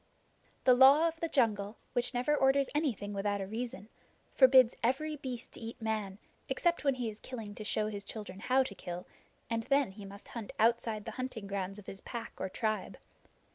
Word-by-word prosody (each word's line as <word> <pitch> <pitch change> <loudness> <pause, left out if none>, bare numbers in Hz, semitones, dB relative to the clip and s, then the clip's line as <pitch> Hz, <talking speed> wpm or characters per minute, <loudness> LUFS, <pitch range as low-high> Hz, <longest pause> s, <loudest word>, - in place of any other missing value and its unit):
The 255 - +7
Law 275 +6 +7
of 325 0 -4
the 330 - -1
Jungle, 215 -6 +1 0.2
which 245 -1 0
never 255 +4 +1
orders 270 -1 +3
anything 250 -9 -1
without 200 0 -1
a 195 - -2
reason, 230 +2 -5 0.5
forbids 260 -2 +7
every 300 +6 0
beast 255 -4 -6
to - - -10
eat 230 0 -7
Man 215 -4 -2 0.3
except 345 -3 +1
when 275 -2 +3
he 245 -2 -2
is 215 -1 -6
killing 225 -5 -7
to 215 - -7
show 215 0 0
his 205 -2 -4
children 205 -3 -8
how 255 +5 +3
to 255 - -6
kill, 175 -2 -6 0.4
and 230 -1 -1
then 275 -6 +2
he 205 +1 -11
must 200 +1 -11
hunt 230 -4 -7
outside 225 -1 +2
the - - -4
hunting 255 -5 -5
grounds 195 0 -3
of 210 - -11
his 195 - -9
pack 235 -2 -6
or 190 - -2
tribe. 215 +2 -2
230 Hz, 195 wpm, -32 LUFS, 205-260 Hz, 0.5 s, The